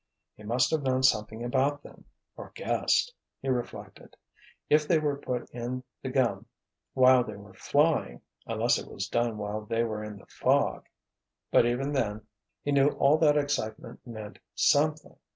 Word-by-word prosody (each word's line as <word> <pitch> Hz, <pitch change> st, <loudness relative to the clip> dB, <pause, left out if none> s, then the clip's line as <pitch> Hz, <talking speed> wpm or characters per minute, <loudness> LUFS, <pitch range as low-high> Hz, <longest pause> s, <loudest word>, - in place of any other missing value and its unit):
"He -, -, -18 dB
must 120 Hz, +4 st, +1 dB
have 160 Hz, -2 st, +1 dB
known 130 Hz, -1 st, 0 dB
something 110 Hz, -2 st, +2 dB
about 135 Hz, +4 st, 0 dB
them—or -, -, -14 dB
guessed," -, -, +1 dB, 0.3 s
he 135 Hz, -, -4 dB
reflected. 125 Hz, -2 st, -5 dB, 0.5 s
"If 150 Hz, 0 st, +3 dB
they 170 Hz, -, +4 dB
were 145 Hz, -2 st, 0 dB
put 125 Hz, -3 st, -4 dB
in 125 Hz, +1 st, -5 dB, 0.2 s
the 130 Hz, -, -4 dB
gum 120 Hz, -5 st, 0 dB, 0.5 s
while 130 Hz, -1 st, +6 dB
they 110 Hz, -2 st, -8 dB
were 100 Hz, -1 st, -13 dB
flying—unless 145 Hz, -, 0 dB
it -, -, -9 dB
was -, -, -4 dB
done 120 Hz, -2 st, 0 dB
while 105 Hz, +1 st, -4 dB
they 115 Hz, +2 st, 0 dB
were 110 Hz, -2 st, -3 dB
in 105 Hz, -1 st, -7 dB
the 100 Hz, -, -16 dB
fog. -, -, 0 dB, 0.6 s
But, 120 Hz, -, +5 dB
even 130 Hz, +4 st, -1 dB
then, 110 Hz, -6 st, -2 dB, 0.4 s
he 145 Hz, -, -1 dB
knew 140 Hz, 0 st, +4 dB
all 145 Hz, +3 st, +3 dB
that 150 Hz, -2 st, +4 dB
excitement 140 Hz, -7 st, -2 dB
meant 110 Hz, -3 st, -8 dB, 0.2 s
something. 150 Hz, +1 st, +2 dB
125 Hz, 155 wpm, -28 LUFS, 110-145 Hz, 0.6 s, while